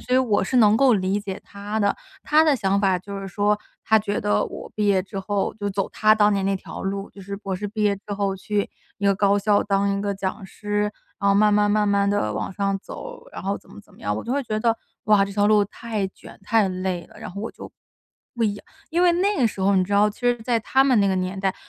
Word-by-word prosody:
所 250 - -6
以 255 - +6
我 230 -6 +2
是 250 +7 -1
能 215 -2 +6
够 260 -1 +5
理 195 +1 0
解 195 -2 -6
他 205 +2 -5
的。 205 -1 +1 0.3
他 305 +1 +5
的 305 -4 +3
想 200 -2 +1
法 190 -2 +2
就 200 +2 -7
是 195 - -6
说， 205 +2 +1 0.3
他 220 - +4
觉 205 -1 -2
得 205 0 +1
我 - - -8
毕 210 - -1
业 195 -2 +4
之 195 +1 -6
后 200 0 -1
就 205 -1 -3
走 195 0 -2
他 215 0 +4
当 210 -1 +4
年 195 -1 0
那 195 0 +1
条 - - -9
路， 195 +1 -3
就 200 - -13
是 200 +1 -6
博 195 -1 -4
士 205 +2 -4
毕 215 0 -2
业 205 -1 +3
之 200 +1 -9
后 200 -1 -1
去 205 +2 -2 0.3
一 200 - 0
个 195 - +4
高 200 0 +3
校 205 0 +3
当 200 0 +1
一 200 - -3
个 205 -1 -1
讲 195 +1 -4
师， 205 +1 -2 0.3
然 200 - +2
后 - - +5
慢 210 +1 +4
慢 205 0 +3
慢 210 0 +2
慢 200 0 +2
地 155 - 0
往 - - -3
上 195 0 0
走， - - -9
然 - - -8
后 200 +1 0
怎 - - -17
么 - - -11
怎 - - -23
么 - - -19
样， 105 0 -2
我 - - -5
就 240 - -2
会 280 +1 0
觉 215 -4 -2
得， 230 +1 +2 0.3
哇， 210 -2 +5
这 200 - -7
条 205 +1 +2
路 210 -1 +4
太 215 0 -4
卷、 - - -15
太 215 +1 +2
累 185 -2 -3
了， - - -17
然 - - -7
后 200 +3 -7
我 225 - -3
就 - - -10 0.7
不 235 - -1
一 210 -2 +1
样 205 - -12 0.3
因 340 +2 +1
为 355 -1 +5
那 395 +4 +1
个 245 - +3
时 200 - -5
候 195 +1 +3
你 185 - +3
知 200 - -6
道， 205 +1 +4
其 210 - -16
实 245 -1 +2
在 235 0 +1
他 265 +4 +2
们 265 -4 +3
那 200 - +3
个 190 - +2
年 185 +1 -2
代， 190 -1 0
205 Hz, 295 characters per minute, -23 LUFS, 195-215 Hz, 0.7 s, 以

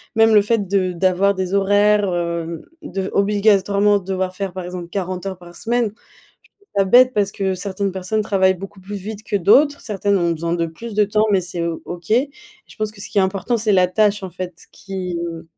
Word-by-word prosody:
même 225 0 +5
le 210 - +7
fait 210 -2 0
de 185 -1 +1
d'avoir 185 +3 +2
des 190 -1 -3
horaires, 205 +1 +3
hem, 170 -1 -3 0.2
de 195 -10 -4
v 190 - -3
obligatoirement 205 0 +3
devoir 185 -1 -3
faire 195 -1 -4
par 185 0 -5
exemple 180 -1 -6
40 185 0 -4
heures 190 -1 -4
par 175 0 -14
semaine. 240 +1 0
Je - - -7 0.6
trouve 405 - -31
ça 195 - +4
bête 250 +6 +6
parce 200 -3 +1
que 190 -1 -1
certaines 195 +1 -3
personnes 190 +3 -2
travaillent 190 -2 +2
beaucoup 195 +2 -10
plus 200 +3 -7
vite 205 +2 -6
que 210 - -3
d'autres, 280 - +4
certaines 200 -2 0
ont 170 -2 +1
besoin 165 +1 -2
de 170 -1 0
plus 205 +7 -8
de 210 - +4
temps 210 +1 +2
mais 195 -2 +3
c'est 175 -1 -4
O 165 -1 -4
OK. 175 -1 -8 0.6
Je - - -16
pense 215 -1 -2
que 215 - -17
ce - - -7
qui 205 - +1
est - - +5
important 195 +5 0
c'est 215 -1 +1
la 185 -1 +5
tâche, 205 +2 +1
en 185 - -6
fait, 180 -1 -6
qui, 185 -2 -5
mmh, 165 -1 -5
195 Hz, 225 wpm, -20 LUFS, 180-210 Hz, 0.6 s, le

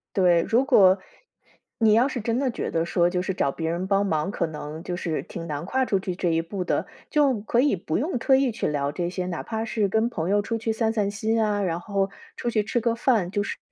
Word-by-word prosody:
对， 180 -3 +4
如 240 +9 +2
果， 195 -8 +6 0.8
你 220 -2 +4
要 240 +5 +5
是 260 - -4
真 230 +3 -1
的 275 - +1
觉 235 - -4
得 165 - +1
说， 175 +1 +2
就 180 -1 0
是 190 - -2
找 140 - +1
别 160 +2 -3
人 170 +3 -2
帮 195 +1 +2
忙 160 +1 0
可 170 - -1
能， 155 0 -7
就 175 -1 -3
是， 170 -3 -2
挺 165 -1 -8
难 150 -1 -4
跨 260 +3 +1
出 200 -5 +1
去 185 -1 -4
这 175 -1 0
一 165 0 +2
步 180 +3 -4
的， - - -1 0.2
就 280 -6 +3
可 235 +3 0
以 280 -4 +3
不 165 -3 -2
用 295 +2 -1
特 265 +3 +3
意 265 -2 +2
去 225 - -2
聊 140 -1 -1
这 175 +3 -2
些， 180 0 -3
哪 175 -2 -4
怕 220 0 -3
是 215 -2 0
跟 220 +4 +1
朋 170 -6 -3
友 205 - +3
出 225 +2 -2
去 225 0 -1
散 220 0 +1
散 210 -3 0
心 220 +2 0
啊， 205 -1 0
然 175 -3 -1
后 195 +1 -1 0.3
出 240 - -2
去 220 -3 +1
吃 225 +3 -1
个 230 0 +1
饭， 225 -7 +1
就 205 +1 -1
是 - - -5
200 Hz, 275 characters per minute, -25 LUFS, 175-230 Hz, 0.8 s, 果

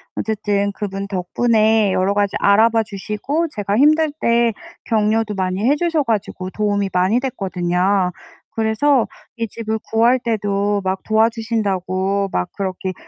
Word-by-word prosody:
어쨌든 205 -2 -1
그분 195 -1 -5
덕분에 215 +2 +2
여러 190 +2 +1
가지 205 -1 0
알아봐 225 +3 +4
주시고 215 - -3
제가 205 0 -1
힘들 310 +3 +4
때 235 -1 +2 0.3
격려도 215 -1 +1
많이 185 0 -2
해 290 - +4
주셔 330 -1 0
가지고 200 -5 -2
도움이 205 -2 0
많이 185 +6 +2
됐거든요. 185 -5 0 0.4
그래서 225 +4 +2 0.3
이 230 - -2
집을 220 +1 -4
구할 235 +3 +4
때도 205 -3 -1
막 190 0 -2
도와 220 +1 +3
주신다고 200 -4 -1
막 90 - -1
그렇게 190 -1 -3
210 Hz, 295 characters per minute, -19 LUFS, 195-230 Hz, 0.4 s, 알아봐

